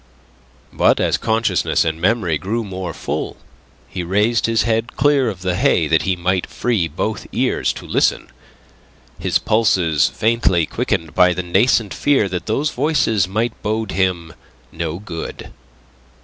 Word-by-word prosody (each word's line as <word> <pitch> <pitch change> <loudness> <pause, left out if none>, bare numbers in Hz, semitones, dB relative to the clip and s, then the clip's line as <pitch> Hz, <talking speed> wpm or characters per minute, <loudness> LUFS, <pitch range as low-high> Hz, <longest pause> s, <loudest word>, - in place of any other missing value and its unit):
But - - +3
as - - +2
consciousness 115 -5 +1
and 80 0 -2
memory 90 -6 +1
grew 110 +8 -2
more 95 -3 -5
full, - - -4 0.5
he 90 - -5
raised 105 +7 +1
his 115 -1 +2
head 115 +1 -1
clear 140 -2 +3
of 95 -4 -7
the 90 -1 0
hay 85 -2 +2
that 80 +1 +3
he 95 -1 0
might 90 +1 -1
free 110 -9 0
both 95 +6 -4
ears - - 0
to - - -10
listen, - - 0 0.9
his - - +1
pulses 95 -9 +2
faintly 105 -7 +1
quickened 80 +1 -2
by 90 0 +4
the 90 - -3
nascent 100 +4 +2
fear 140 -8 +2
that 90 -1 -4
those 140 +7 0
voices 125 - +1
might 110 +5 -1
bode 110 0 -2
him 90 -4 -1 0.4
no 80 0 -4
good. 90 -4 -7
95 Hz, 150 wpm, -19 LUFS, 85-115 Hz, 0.9 s, by